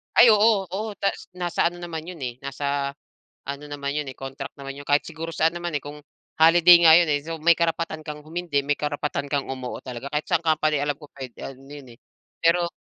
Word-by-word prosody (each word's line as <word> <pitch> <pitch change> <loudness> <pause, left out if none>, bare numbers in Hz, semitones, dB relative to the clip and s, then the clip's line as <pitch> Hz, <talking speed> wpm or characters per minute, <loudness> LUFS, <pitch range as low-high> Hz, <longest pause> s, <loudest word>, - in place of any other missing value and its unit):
Ay, - - +8
oo. 210 -2 +4
Oo, 210 +5 -4
tas 195 - -2
nasa 180 -1 -1
ano 175 - -11
naman 165 -2 -6
'yon 175 0 -9
eh, 125 -2 -4
nasa 140 0 -2 0.6
ano 140 +1 -5
naman 140 -1 -4
'yon, 150 -1 -2
eh, - - -14
contract 135 0 -7
naman 135 0 -7
'yon 145 - -9
kahit 145 +1 +3
siguro 165 +1 -6
saan 160 +1 +1
naman, 175 0 -4
eh, - - -8
kung 145 +1 -9 0.3
holiday 170 +2 +7
nga 160 -1 +9
'yon, 170 - +2
eh. 145 - +2
So, 165 +1 -6
may 170 +2 +5
karapatan 165 -1 -1
kang 150 0 -7
humindi, 165 -1 -2
may 145 +1 0
karapatan 145 -1 -3
kang 140 -2 -1
umuo 130 -2 -5
talaga 130 +2 -8
kahit 150 +1 -2
saang 165 - +1
company 155 -2 +2
alam 145 0 -1
ko 150 - -12
puwede 130 -3 -10
ano 135 +1 -9
yun, 135 -5 -11
eh. 120 - -34 0.4
Pero 170 +1 +3
150 Hz, 220 wpm, -24 LUFS, 140-170 Hz, 0.6 s, nga